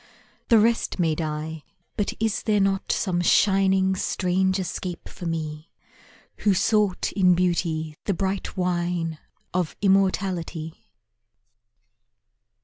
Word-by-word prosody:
The 230 - +7
rest 230 +2 +2
may 165 -4 +2
die 155 0 -4 0.3
but 205 - -1
is 220 -1 0
there 210 -2 +1
not 195 0 +1
Some 180 -3 0
shining 190 +1 +3
strange 185 0 0
escape 180 -1 -5
for 175 - -7
me 155 -1 -4 0.7
Who 205 -2 +2
sought 210 -1 +1
in 180 -3 +4
Beauty 165 -3 0
the 200 - 0
bright 195 +2 -3
wine 175 -3 -1 0.3
Of 180 -3 -1
immortality? 185 -4 0
185 Hz, 110 wpm, -24 LUFS, 165-195 Hz, 0.7 s, The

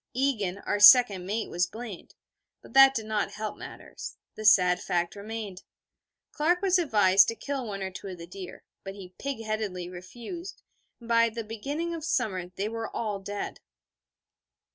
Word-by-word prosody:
Egan, 225 -9 0
our 205 - 0
second 205 -4 +8
mate, 215 +3 -2
was 175 +1 0
blamed; 220 -5 -9 0.5
but - - -15
that 270 0 +8
did 220 - -2
not 215 -1 -1
help 215 0 -4
matters: - - -9 0.2
the 215 - -8
sad 180 -4 +5
fact 175 +1 -1
remained. 205 -2 -6 0.7
Clark 340 +4 +1
was 375 -1 +4
advised 200 - +5
to 230 - -2
kill 275 -1 -4
one 195 -2 -4
or 190 - -4
two 190 - -8
of 185 -2 -7
the 170 - -9
deer, 180 +1 -10 0.2
but 195 0 -7
he 185 -2 -11
pig 275 -5 -4
headedly 210 -5 -3
refused: 235 - -9 0.4
and 235 - -13
by 230 0 +4
the 230 0 -5
beginning 285 +10 -4
of 330 -2 -6
summer 195 - -1
they 190 +3 -4
were 225 0 -4
all 210 -3 -3
dead. 200 +1 -5
215 Hz, 170 wpm, -28 LUFS, 190-240 Hz, 0.7 s, second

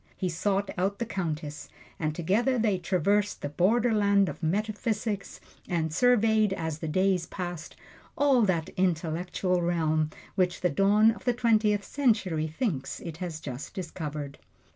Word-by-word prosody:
He 185 - -1
sought 195 +4 -1
out 195 +2 0
the 235 - -2
Countess, 155 -7 -4 0.3
and 155 -1 -1
together 215 +10 +1
they 215 -5 +1
traversed 200 +3 +1
the 145 - -2
border 220 +10 +2
land 200 -2 +3
of - - -8
metaphysics, 210 +3 -2 0.3
and 160 -3 -1
surveyed, 220 -2 +3
as 160 -4 -3
the 160 - -4
days 185 +1 +1
passed, 175 -4 -6 0.4
all 275 -4 +4
that 180 -7 +1
intellectual 180 +1 0
realm 160 -3 +1 0.2
which 180 -2 0
the 180 - +2
dawn 205 +7 +4
of 220 0 -10
the 245 - +3
Twentieth 215 -4 +2
Century 205 - +1
thinks 155 - -3
it 165 -3 -7
has 170 -3 -5
just 130 -2 -7
discovered. 155 -5 -5
185 Hz, 145 wpm, -28 LUFS, 160-210 Hz, 0.4 s, all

